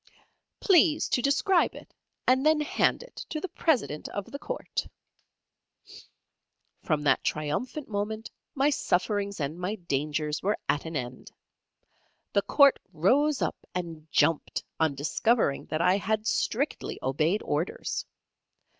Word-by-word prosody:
"Please 345 -5 +4
to 245 - +2
describe 315 +7 +2
it, - - -12 0.3
and 260 +1 +4
then 310 0 +4
hand 300 +9 +1
it - - -17
to 310 - -3
the 380 - -4
President 260 - 0
of 205 - -6
the 280 - -6
Court." - - -4 1.9
From 155 -3 0
that 135 -2 +3
triumphant 155 - -2
moment 215 +1 -3 0.2
my 280 +2 +3
sufferings 200 -4 0
and 150 +3 -3
my 185 +4 -2
dangers 150 -3 -2
were 205 +3 +1
at 145 - 0
an 160 0 -5
end. 125 -2 -5 1.0
The 200 - +4
court 280 +5 +5
rose 265 - +2
up - - -4
and 165 -3 -5
jumped, 165 -2 +2 0.2
on 160 -3 +2
discovering 155 - +1
that 155 - -1
I 180 +2 +4
had 215 +2 -1
strictly 270 +5 -1
obeyed 155 +10 +1
orders. 150 +5 -2
200 Hz, 130 wpm, -28 LUFS, -, 1.9 s, court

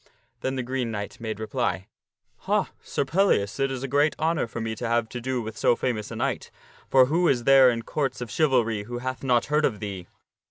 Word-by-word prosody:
Then 130 0 -2
the 130 - -2
Green 125 -1 -2
Knight 105 -2 -5
made 110 -2 -4
reply, 110 -3 -2 0.3
" - - -48
Ha, - - +1
Sir - - -2
Pellias, 140 - +1
it 135 0 +2
is 130 -1 -4
a - - -2
great 145 +3 +2
honor 160 -4 0
for 115 - -6
me 110 -1 -2
to 120 - -3
have 115 -1 +1
to 120 - -6
do 130 -1 -2
with 110 0 -6
so 105 - +3
famous 110 -5 -2
a - - -7
knight, - - -2 0.4
for 130 -1 +6
who 170 +6 +2
is 125 -5 +2
there 135 0 +7
in 115 -1 -2
Courts 140 +2 -2
of 120 -3 -6
Chivalry 115 -8 +1
who 120 +2 -5
hath 130 +1 -4
not 125 -3 +2
heard 150 +1 +1
of 110 -8 +1
thee? 95 -4 -6
125 Hz, 230 wpm, -25 LUFS, 115-135 Hz, 0.4 s, there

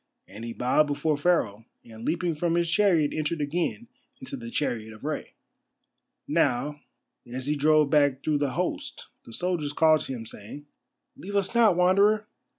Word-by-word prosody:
And 100 +5 -10
he 115 - -5
bowed 125 +6 +2
before 150 +1 0
Pharaoh, 130 - 0 0.2
and 115 -1 -11
leaping 170 +4 0
from 165 +2 0
his 170 0 +1
chariot 175 -7 +3
entered 155 +1 -2
again 170 +10 -2 0.3
into 270 +1 -7
the 235 -3 -7
chariot 115 - -2
of 110 - -16
Rei. - - -4 0.9
Now, 145 +4 0 0.5
as 130 +1 -5
he 150 +1 0
drove 150 0 +3
back 145 -3 +3
through 150 -2 +1
the 140 -3 -1
host - - -4 0.2
the - - -12
soldiers 165 +1 -2
called 155 0 +4
to 135 - -4
him, 115 -3 -6
saying: 110 +7 -8 0.5
"Leave 200 +2 -7
us 200 +1 +1
not, 230 -5 +5
Wanderer." 200 +4 +3
150 Hz, 165 wpm, -26 LUFS, 130-180 Hz, 0.9 s, not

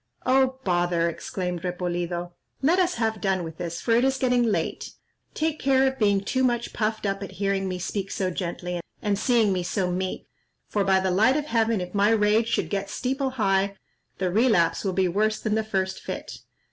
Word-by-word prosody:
"Oh, 260 0 +3
bother!" 175 -2 +1
exclaimed 180 +1 -4
Repolido; 175 -1 -3 0.3
"let 335 +7 +4
us 360 -1 +2
have 220 -2 -1
done 190 -2 +1
with 160 -1 -8
this, 170 -1 -4
for - - -1
it 235 +2 +4
is 265 0 +2
getting 250 -2 +2
late; 230 -3 -1 0.4
take 315 0 -1
care 265 0 +3
of 265 0 -1
being 205 -2 +3
too 260 +6 0
much 240 -2 0
puffed 215 0 -1
up 195 0 -1
at 195 - -7
hearing 195 -1 -1
me 185 - -3
speak 195 +2 -3
so 185 -2 -1
gently, 180 0 -4 0.2
and 205 -1 0
seeing 230 -5 +3
me 180 - -1
so 180 +1 -1
meek; 185 +1 -3 0.4
for, 205 - 0
by 190 -1 +3
the 190 0 0
light 220 +9 +4
of 300 - -2
heaven, 230 -6 +1
if 180 0 -6
my 205 +1 +3
rage 220 0 +3
should 235 - -1
get 200 -1 -2
steeple 270 +1 -1
high, 200 -5 +1 0.4
the 185 -2 -1
relapse 205 -6 +3
will 195 -2 -1
be 190 0 +2
worse 215 +4 +1
than 215 - -1
the 220 0 +1
first 190 -3 -2
fit. - - -6
200 Hz, 200 wpm, -25 LUFS, 185-235 Hz, 0.4 s, let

